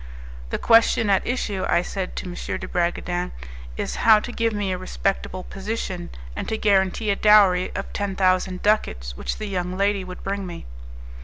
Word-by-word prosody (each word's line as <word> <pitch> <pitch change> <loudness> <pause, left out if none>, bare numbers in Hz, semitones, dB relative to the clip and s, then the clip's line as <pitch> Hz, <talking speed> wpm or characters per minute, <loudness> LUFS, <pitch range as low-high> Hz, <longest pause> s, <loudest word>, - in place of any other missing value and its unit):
"The - - -1
question 225 -2 +4
at 195 - +2
issue," 210 -6 -1
I 175 - +3
said 190 0 -4
to - - -4
M. 180 - -6 0.2
de - - -7
Bragadin, 175 0 -1 0.4
"is - - -3
how 220 -2 +6
to 245 - -6
give 230 -1 0
me 205 -2 -2
a 185 - -1
respectable 185 0 -2
position, 190 -3 -5 0.3
and - - -4
to 220 - -1
guarantee 200 +1 +2
a - - +2
dowry 200 -4 +5
of 195 - -5
ten 200 -2 -2
thousand 185 -1 +1
ducats 60 - 0
which - - -4
the 215 - -4
young 185 -2 -3
lady 200 0 +1
would 185 0 -9
bring 195 -1 -3
me." 175 - -8
195 Hz, 180 wpm, -23 LUFS, 180-210 Hz, 0.4 s, how